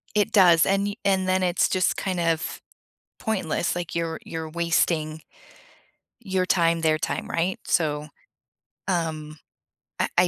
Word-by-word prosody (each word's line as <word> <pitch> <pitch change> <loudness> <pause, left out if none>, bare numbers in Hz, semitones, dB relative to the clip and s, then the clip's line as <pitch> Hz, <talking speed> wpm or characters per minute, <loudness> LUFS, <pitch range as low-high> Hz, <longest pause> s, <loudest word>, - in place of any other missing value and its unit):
It 210 +1 +2
does, 175 -6 +6
and 195 +1 +1
you 205 - -4
and 190 -1 +2
then 185 0 +2
it's 180 0 +2
just 185 -1 +1
kind 185 -2 -2
of 165 -1 -1 0.6
pointless. 185 -6 -1
Like, 175 -2 -4
you're 165 -1 -2
you're 160 -1 -5
wasting 160 -1 0 1.0
your 190 -3 -1
time, 170 -2 +2
their 155 -1 +2
time, - - -3
right? 175 +3 -1
So, 150 -3 0 0.8
um, 160 -4 -2 0.6
I - - +2
I 180 - +6
170 Hz, 140 wpm, -25 LUFS, 160-185 Hz, 1.0 s, does